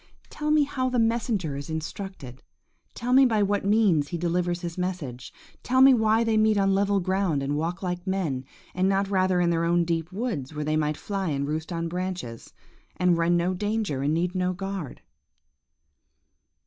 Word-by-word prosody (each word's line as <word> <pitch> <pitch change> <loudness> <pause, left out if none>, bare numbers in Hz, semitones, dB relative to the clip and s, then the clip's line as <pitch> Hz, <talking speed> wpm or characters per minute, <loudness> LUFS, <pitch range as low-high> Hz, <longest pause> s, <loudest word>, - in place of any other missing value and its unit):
Tell 300 0 -3
me 305 -1 +5
how 260 -2 -1
the 250 - -1
messenger 225 - 0
is 140 +3 -6
instructed. 160 -4 -6 0.5
Tell 245 +1 -2
me 270 +1 +7
by 220 -5 +3
what 200 0 0
means 200 -8 +3
he 170 - -4
delivers 175 +1 -1
his 170 -2 -5
message. 170 -9 -4 0.3
Tell 260 +1 +1
me 265 0 +8
why 220 -1 +3
they 225 -1 +1
meet 215 -1 +3
on 195 -1 +3
level 200 +1 +2
ground 185 -6 0
and 140 +1 -1
walk 170 +5 -3
like 180 0 -4
men, 170 -9 -1 0.3
and 185 +1 +1
not 195 0 0
rather 185 -1 +2
in 175 -1 +2
their 165 0 +1
own 170 0 +2
deep 165 0 -2
woods, 185 - -4
where 150 0 -3
they 155 +1 0
might 150 -1 0
fly 195 -3 -3
and 140 -1 -1
roost 155 +3 -3
on 165 -1 -2
branches, 180 -9 -5 0.5
and 180 -1 +3
run 170 +1 +3
no 175 +2 0
danger, 205 -7 -2
and 145 +3 +1
need 175 +2 0
no 185 -1 0
guard? 195 -6 -6
180 Hz, 185 wpm, -26 LUFS, 165-205 Hz, 0.5 s, me